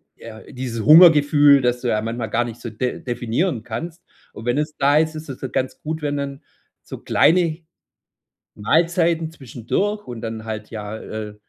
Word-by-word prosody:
ja 110 Hz, -1 st, -11 dB
dieses 125 Hz, -4 st, -5 dB
Hungergefühl, 150 Hz, -3 st, +7 dB
dass 125 Hz, 0 st, 0 dB
du 125 Hz, -, -3 dB
ja 105 Hz, -, +1 dB
manchmal 115 Hz, 0 st, -4 dB
gar 120 Hz, +3 st, +1 dB
nicht 120 Hz, 0 st, -9 dB
so 120 Hz, -, -6 dB
def 125 Hz, +3 st, -4 dB
definieren 120 Hz, -, -2 dB
kannst. 160 Hz, +10 st, -7 dB, 0.3 s
Und 110 Hz, -, -10 dB
wenn 120 Hz, +2 st, 0 dB
es 150 Hz, 0 st, -4 dB
da 140 Hz, +2 st, +3 dB
ist, 155 Hz, 0 st, +1 dB
ist 155 Hz, -1 st, -8 dB
es 135 Hz, -, -7 dB
dann 130 Hz, -, -6 dB
ganz 130 Hz, -1 st, -2 dB
gut, 160 Hz, +1 st, -4 dB
wenn 145 Hz, -1 st, -1 dB
dann 140 Hz, 0 st, -5 dB, 0.4 s
so -, -, -9 dB
kleine 165 Hz, -1 st, +2 dB, 1.0 s
Mahlzeiten 165 Hz, -, +1 dB
zwischendurch 160 Hz, -, -3 dB
und 120 Hz, -2 st, -7 dB
dann 110 Hz, -1 st, -6 dB
halt 110 Hz, -1 st, -6 dB
ja, 105 Hz, -1 st, -6 dB
äh 110 Hz, -1 st, -7 dB
130 Hz, 180 wpm, -21 LUFS, 115-155 Hz, 1.0 s, Hungergefühl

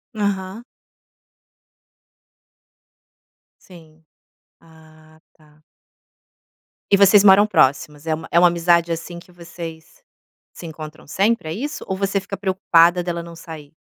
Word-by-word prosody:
Aham. 200 Hz, +1 st, -3 dB, 3.0 s
Sim. 160 Hz, -3 st, -18 dB, 0.6 s
Ah, 155 Hz, -1 st, -21 dB
tá. 150 Hz, 0 st, -26 dB, 1.3 s
E 200 Hz, -, +5 dB
vocês 200 Hz, +1 st, +6 dB
moram 200 Hz, +1 st, +6 dB
próximas? 150 Hz, -3 st, 0 dB
É 160 Hz, -, -1 dB
uma 160 Hz, +1 st, -6 dB
é 170 Hz, -, +4 dB
uma 175 Hz, -, +6 dB
amizade, 170 Hz, 0 st, +1 dB
assim, 170 Hz, +1 st, -6 dB
que 180 Hz, -, -19 dB
vocês 170 Hz, -, -11 dB, 0.5 s
se 175 Hz, -, -11 dB
encontram 155 Hz, -2 st, -10 dB
sempre, 195 Hz, 0 st, -1 dB
é -, -, -4 dB
isso? 290 Hz, -, -6 dB
Ou 190 Hz, -, -3 dB
você 195 Hz, 0 st, -1 dB
fica 195 Hz, 0 st, -8 dB
preocupada 180 Hz, -2 st, +2 dB
dela 170 Hz, -1 st, -4 dB
não 170 Hz, 0 st, -12 dB
sair? 160 Hz, -2 st, -12 dB
170 Hz, 120 wpm, -20 LUFS, 160-190 Hz, 3.0 s, vocês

